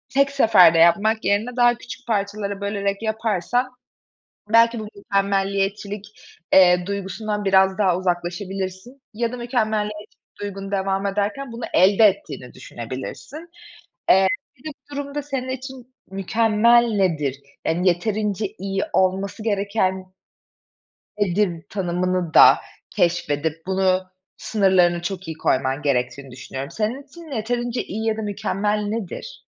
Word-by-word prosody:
tek 275 0 +4
seferde 210 -11 +6
yapmak 205 +7 +4
yerine 210 +5 0
daha 240 0 +5
küçük 245 +1 -10
parçalara 200 -2 -2
bölerek 200 0 -2
yaparsan 220 +2 -1 0.8
belki 230 +1 +5
bu 215 - -6
mükemmeliyetçilik, 200 +1 -1 0.5
eee, 180 -1 +6
duygusundan 200 +2 -3
biraz 190 0 +3
daha 190 -4 +3
uzaklaşabilirsin. 185 +6 -4
Ya 235 +1 -1
da - - -4
mükemmeliyetçilik 215 -4 -2 0.2
duygun 195 -1 -6
devam 195 0 0
ederken 210 +6 -2
bunu, 230 +1 -8
elde 200 +4 +5
ettiğini 195 -11 0
düşünebilirsin. 130 - -8 0.6
Eee, 190 +1 +6 0.3
bir 250 - -24
de - - -8 0.2
bu - - -7
durumda, 285 +1 -4
senin 270 -3 -4
için 260 -1 -7 0.2
mükemmel 225 +4 +3
nedir? 150 -8 0 0.3
Yani, 175 +3 +1
"Yeterince 210 +3 -1
iyi 195 +1 -2
olması 190 +3 0
gereken 195 -3 -1 1.1
nedir?" 185 -3 0
tanımını 180 -2 -1
da - - +8 0.3
keşfedip 160 -2 -1
bunu 190 0 +2 0.4
sınırlarını 185 -5 +2
çok 190 +1 -5
iyi 160 -1 -6
koyman 135 0 0
gerektiğini 135 -1 -1
düşünüyorum. 135 +3 -7
Senin 225 +8 -2
için 305 0 -10
yeterince 240 +2 -2
iyi 220 +3 -5
ya 220 -1 0
da - - -3
mükemmel 210 0 -1
nedir? 205 -2 -5
200 Hz, 120 wpm, -22 LUFS, 185-225 Hz, 1.1 s, da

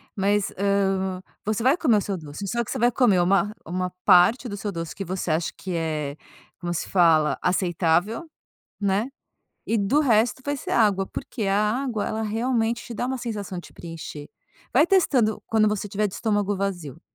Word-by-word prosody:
mas, 200 0 +1
hã, 195 -2 +1 0.2
você 215 +2 -1
vai 265 +5 +5
comer 240 -11 +3
o - - +1
seu 195 -1 -3
doce. 155 +5 -7
Só 235 +3 0
que - - -12
você - - -2
vai 240 +2 +3
comer 220 -8 +3
uma, 195 +3 +2
uma 180 +2 -2 0.2
parte 220 +8 +5
do 200 - -4
seu 205 0 -3
doce 165 -2 -5
que 195 - -4
você 180 -2 -2
acha 160 +1 0
que 185 -2 -5
é, 155 -3 -2 0.4
como 175 -1 -3
se - - -3
fala, 165 -4 +4
aceitável, 180 - +1 0.5
né, 200 +4 +1 0.6
e 225 - +1 0.2
o 300 - +6
resto 235 -2 +2
vai 285 0 0
ser - - -6
água, 200 -4 +3
porque 260 -4 -5
a 195 +1 +2 0.3
água, 230 -6 -2
ela 220 - -2
realmente 230 +1 0
te 240 - -7
dá 245 +3 -2
uma 260 0 -2
sensação 205 -6 -5
de - - -14
preencher. 165 -3 -8 0.4
Vai 290 +6 +6
testando 265 - +2
quando 220 -1 +3
você 210 0 -1
estiver 205 +1 0
de 190 - -9
estômago 205 -3 0
vazio, 175 -7 -4
200 Hz, 190 wpm, -24 LUFS, 180-230 Hz, 0.6 s, o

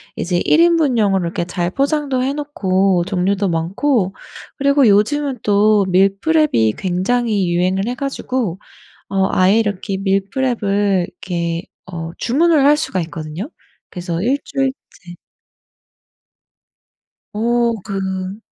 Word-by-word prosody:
이제 175 0 -1
1 315 - +4
인분용으로 245 - +3
이렇게 170 0 -2
잘 175 -1 -2
포장도 280 -1 0
해 275 +2 -1
놓고 195 -11 0
종류도 195 +1 0
많고 190 - 0 0.4
그리고 280 -2 +3
요즘은 260 +6 +2
또 205 0 +3
밀프렙이 195 - +2
굉장히 195 +1 0
유행을 185 +4 0
해 245 - -2
가지고 255 - -3 0.5
어 195 -1 +1
아예 190 +4 +3
이렇게 200 -2 -2
밀프렙을 200 -1 0
이렇게 170 -2 -4 0.3
어 165 -1 -5
주문을 300 +3 +2
할 295 +1 +5
수가 190 - -2
있거든요. 160 - -6 0.4
그래서 175 -2 -4
1 260 +6 +1
주일치 260 -10 -5 2.2
오 235 +2 +1
그 190 0 -4
200 Hz, 245 characters per minute, -18 LUFS, 185-260 Hz, 2.2 s, 할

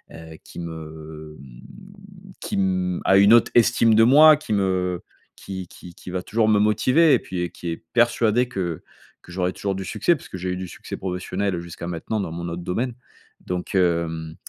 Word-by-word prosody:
heu, 80 -1 -11
qui - - -11
me 80 -2 -9
mmh, 65 -3 -15
qui - - -4
mmh, 90 -2 0
a 95 - +5
une 100 +3 +6
autre 120 - +3
estime 115 -1 +4
de 115 - +6
moi, 150 +5 +7
qui 150 -8 -4
me 95 -3 -1 0.3
qui 95 -2 -7
qui 90 0 -13
qui - - -11
va 90 0 -3
toujours 110 +2 0
me 105 -1 +4
motiver. 125 +9 +3
Et - - +4
puis, 90 -1 -5
heu, - - -3
qui 85 - -7
est 80 - -7
persuadé 120 0 +2
que 85 -6 -4 0.4
que 90 - -14
j'aurais 90 0 -1
toujours 100 -1 -3
du 95 0 -5
succès, 170 - +1
puisque 95 - -9
j'ai 90 +1 -4
eu 90 - -2
du 95 0 -5
succès - - -8
professionnel 90 0 -3
jusqu'à 85 0 -8
maintenant, 90 +6 -3
dans 80 - -5
mon 85 +1 -5
autre 85 +1 -6
domaine. 115 +8 -2 0.5
Donc, 90 +1 -4
hem, 85 -3 0
90 Hz, 195 wpm, -23 LUFS, 85-105 Hz, 0.5 s, moi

